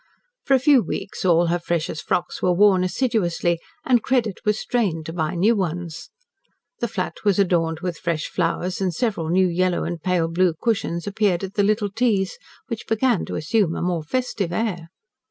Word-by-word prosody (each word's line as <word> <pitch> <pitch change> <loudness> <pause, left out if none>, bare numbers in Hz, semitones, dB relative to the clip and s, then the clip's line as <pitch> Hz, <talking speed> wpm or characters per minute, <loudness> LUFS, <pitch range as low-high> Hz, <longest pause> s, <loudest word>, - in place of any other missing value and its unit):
For 275 - +4
a - - +3
few 270 0 +5
weeks 195 -2 -5
all 175 -1 +4
her 175 +1 0
freshest 170 -2 -3
frocks 175 - -1
were 180 - +3
worn 190 0 +4
assiduously 180 -6 0 0.3
and 245 -3 +4
credit 240 -6 0
was 210 -1 +1
strained 190 -12 -1
to 160 - -6
buy 160 0 -2
new 210 +7 +3
ones. 175 -3 -4 0.7
The 235 - 0
flat 195 -4 -4
was 205 -3 +3
adorned 170 -4 +1
with 180 -4 -4
fresh 165 -2 -1
flowers 180 +2 -1
and 185 -2 +1
several 170 -3 -1
new 185 +2 +3
yellow 180 +1 +1
and 170 -2 -4
pale 180 -2 +1
blue 170 0 +1
cushions 210 -7 -1
appeared 200 -3 0
at 190 0 -5
the 205 - +1
little 205 0 +1
teas, 205 -4 0 0.3
which 230 -2 -6
began 225 -2 +1
to - - -5
assume 165 +2 +1
a - - -3
more 175 -2 0
festive 200 0 -2
air. 175 -5 -2
185 Hz, 185 wpm, -22 LUFS, 170-215 Hz, 0.7 s, few